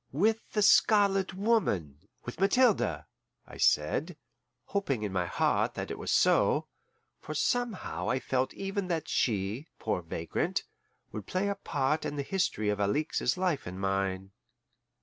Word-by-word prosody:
"With 215 - 0
the 210 - +2
Scarlet 200 -3 +4
Woman 175 - 0 0.3
with 120 +6 -7
Mathilde," 220 +3 +3 0.4
I - - -12
said, 145 - +1 0.5
hoping 140 - -1
in 100 -2 -3
my 90 -2 0
heart - - +1
that - - -4
it - - -5
was - - -3
so, - - +3 0.5
for 155 - -7
somehow 245 +4 -1
I 130 - +1
felt 130 0 -1
even 195 0 -3
then 170 -2 +1
that 160 - -9
she, 110 +5 -1
poor 90 - -2
vagrant, 85 -1 -2 0.5
would 105 - -7
play 190 +2 0
a - - +1
part 145 -1 -1
in - - -3
the 140 - -2
history 135 - -1
of 105 0 -1
Alixe's 125 - 0
life 180 - -1
and 90 +1 -6
mine. 95 0 -1
145 Hz, 150 wpm, -30 LUFS, -, 0.5 s, Scarlet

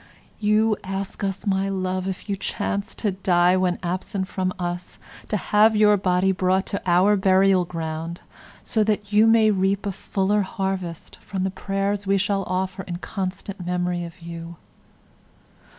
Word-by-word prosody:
You 215 0 +3
ask 195 +1 -4
us, 195 -1 -2
my 195 -1 +1
love, 185 -1 -2
if 190 +1 -5
you 200 - -1
chance 200 +1 -3
to 210 - -1
die 180 -1 +3
when 185 -1 +1
absent 185 +2 -2
from 185 -1 -1
us, 175 0 -4 0.3
to 210 - +1
have 215 +3 +4
your 210 0 +5
body 185 -1 +2
brought 185 +1 +1
to 195 - -1
our 185 +4 +5
burial 190 -1 +4
ground 165 0 -5 0.4
so 220 - +1
that 210 -1 -1
you 215 +2 +6
may 225 -1 +5
reap 195 0 +1
a 200 - 0
fuller 195 +2 0
harvest 190 -3 -4
from 190 -2 -4
the 190 - 0
prayers 195 +1 -2
we 195 0 +3
shall 200 0 +1
offer 185 +1 -2
in 175 -1 -4
constant 190 0 -5
memory 180 0 -1
of 170 +1 -10
you. 170 0 -7
190 Hz, 160 wpm, -23 LUFS, 180-200 Hz, 0.4 s, you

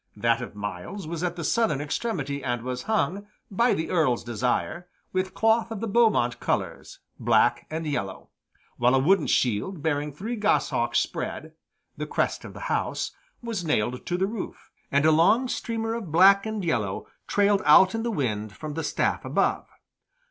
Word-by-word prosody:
That 115 +3 +2
of 120 - -7
Myles 105 - -6
was 165 +1 -5
at 175 -1 -1
the 170 - -5
southern 215 -3 +1
extremity 145 - -3
and 120 -2 -2
was 125 0 -3
hung, 205 -2 0 0.2
by 235 +5 +3
the 160 - -3
Earl's 155 -9 +2
desire, 125 +9 -2 0.3
with 185 0 -1
cloth 225 +1 +2
of 225 -3 -5
the 230 - -3
Beaumont 210 - +2
colors - - -3 0.2
(black 120 +1 +2
and 160 +1 -4
yellow), 100 -11 -4 0.5
while 125 +2 +3
a - - +5
wooden 160 +5 +3
shield 130 - 0
bearing 150 -1 0
three 210 - -5
goshawks 210 -2 +1
spread - - -4 0.4
(the - - -4
crest - - -1
of - - -10
the - - -9
house) - - -2 0.3
was 225 -6 -3
nailed 125 -5 -1
to 175 - 0
the 190 - +1
roof, 210 0 -7 0.2
and 140 +2 +3
a 160 - +6
long 195 +11 +4
streamer 225 -2 -2
of 220 -8 -5
black 195 +5 +6
and 215 -4 -3
yellow 105 - -1 0.2
trailed 200 -1 +3
out 180 +6 +7
in 225 - -1
the 235 - -1
wind 110 - -2
from 155 -1 -6
the 160 +2 -3
staff - - 0
above. - - 0
165 Hz, 175 wpm, -26 LUFS, 125-205 Hz, 0.5 s, out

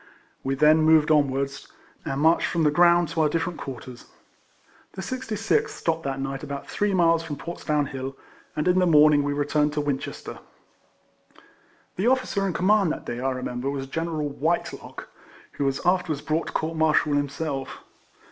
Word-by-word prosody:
We 135 0 -1
then 155 +3 +5
moved 155 -1 +4
onwards, 140 -2 0 0.4
and 135 +1 -2
marched 160 +2 +4
from 170 -2 0
the 150 - +4
ground 175 0 +4
to 160 - -1
our 155 - +3
differ 165 +3 -1
ent 170 - -12
quarters. 125 -2 -8 0.9
The 190 - -6
66th 255 - -1
stopped 165 -1 -2
that 135 -1 -2
night 135 0 -4
about 140 -2 -6
three 205 0 -1
miles 165 -3 +3
from 165 -3 -5
Portsdown 150 -1 -2
Hill, 135 0 -6 0.4
and 150 - -1
in 180 +1 +4
the 180 - +3
morning 150 -2 +6
we 145 0 -1
returned 145 +1 0
to 150 - -1
Winchester. 145 -2 -4 1.6
The 195 +5 +1
officer 250 -6 +1
in 185 - -2
command 195 -1 +3
that - - -6
day, 120 - -4
I 135 +1 0
remem 125 -1 -4
ber, 135 - -1
was 140 -1 -3
General 160 +1 -3
Whitelock, 160 +4 -3 0.4
who 140 - -3
was 135 0 0
after 180 0 +2
wards 145 - -7
brought 160 +1 -1
to - - -7
court 160 +1 -2
martial 155 -2 +2
himself. 145 -1 -3
150 Hz, 175 wpm, -25 LUFS, 140-170 Hz, 1.6 s, morning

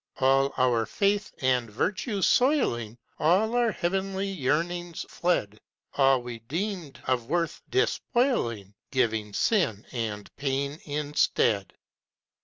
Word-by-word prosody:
All 135 +1 +3
our 120 -4 +2
faith 205 - 0
and 125 -3 +1
virtue 190 - -1
soiling, 120 - +2 0.2
All 190 +9 +3
our 240 -2 +3
heavenly 195 +2 -1
yearnings 175 +1 -1
fled, 105 - -1 0.3
All 135 -2 +4
we 120 -1 -6
deemed 165 - -4
of 125 -2 -1
worth, 170 0 -1
despoiling, 240 - 0 0.2
Giving 110 -5 0
sin 115 - +1
and 110 -4 -4
pain 140 +1 -2
instead. 145 -8 +1
140 Hz, 105 wpm, -27 LUFS, 120-190 Hz, 0.3 s, All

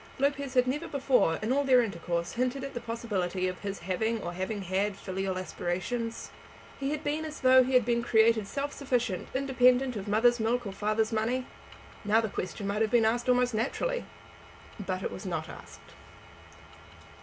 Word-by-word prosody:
Lopez 280 -1 -1
had 250 -1 +5
never 295 +6 -2
before, 260 - +2
in 220 - 0
all 285 +1 +2
their 255 -3 +5
intercourse, 170 -4 -3
hinted 255 +2 -1
at 275 - -6
the - - -3
possibility 200 -6 -2
of 185 0 -4
his 200 -1 -4
having 220 +6 -1
or 175 - -4
having 190 +3 -3
had 195 +2 -1
filial 190 -1 -3
aspirations. 225 +6 -3 0.5
He 275 0 -1
had 300 +1 -3
been 300 +2 -1
as 310 -1 -7
though 260 0 +7
he 260 +1 0
had 250 -3 +5
been 235 -1 +1
created 220 -2 +3
self 280 +6 -3
sufficient, 245 -9 -1
independent 255 -1 +3
of 205 -1 -5
mother's 235 +4 +3
milk 235 +2 0
or 200 - -4
father's 215 +2 0
money. 230 +4 0 0.6
Now 210 +2 +4
the 220 -1 -1
question 195 +1 -5
might 200 +2 -1
have 220 - +2
been 235 -1 +4
asked 240 +3 +1
almost 250 -1 +3
naturally. 485 - -1 0.8
But 185 0 -3
it - - -2
was 190 - -7
not 160 -3 -3
asked. - - -12
230 Hz, 180 wpm, -29 LUFS, 195-255 Hz, 0.8 s, though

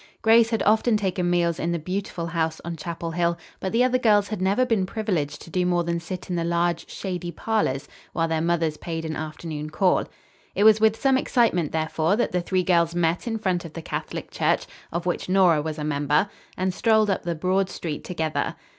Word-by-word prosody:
Grace 225 0 +6
had 225 -2 0
often 220 +1 +3
taken 185 -3 -1
meals 170 -1 +1
in 170 - -1
the 170 - 0
beautiful 180 +1 -4
house 160 -1 -1
on 170 0 -4
Chapel 165 +1 -5
Hill, 170 0 0 0.2
but 190 - -3
the 235 +2 +3
other 255 0 +2
girls 210 -4 +3
had 215 -4 -4
never 200 +7 +2
been 220 -6 +1
privileged 180 -10 -2
to 165 - -13
do 180 +1 +1
more 175 -1 +1
than 170 0 -1
sit 175 +2 -7
in 180 - -2
the 170 - 0
large, 170 0 0
shady 180 -2 -4
parlors 170 -8 -1 0.2
while 165 0 0
their 160 -1 0
mothers 165 -2 0
paid 165 0 -5
an 160 0 -3
afternoon 155 0 -5
call. 180 +4 +2 0.5
It 205 - +2
was 215 0 +6
with 220 0 +3
some 265 -1 +3
excitement, 220 - +1
therefore, 160 +3 +1
that 240 - 0
the 180 - 0
three 185 +1 0
girls 170 -2 +2
met 170 +4 0
in 225 -1 -1
front 185 -5 -1
of 165 -2 -9
the 165 - -6
Catholic - - -5
Church, - - +1 0.3
of 170 +1 -3
which 180 0 -2
Nora 180 -5 +4
was 155 +1 -4
a 150 - -4
member, 150 +4 +1 0.3
and 185 0 0
strolled 220 0 +3
up 190 - -1
the 170 -1 -3
broad 185 +3 +1
street 155 -4 -5
together. 160 -3 -2
175 Hz, 215 wpm, -24 LUFS, 165-200 Hz, 0.5 s, Grace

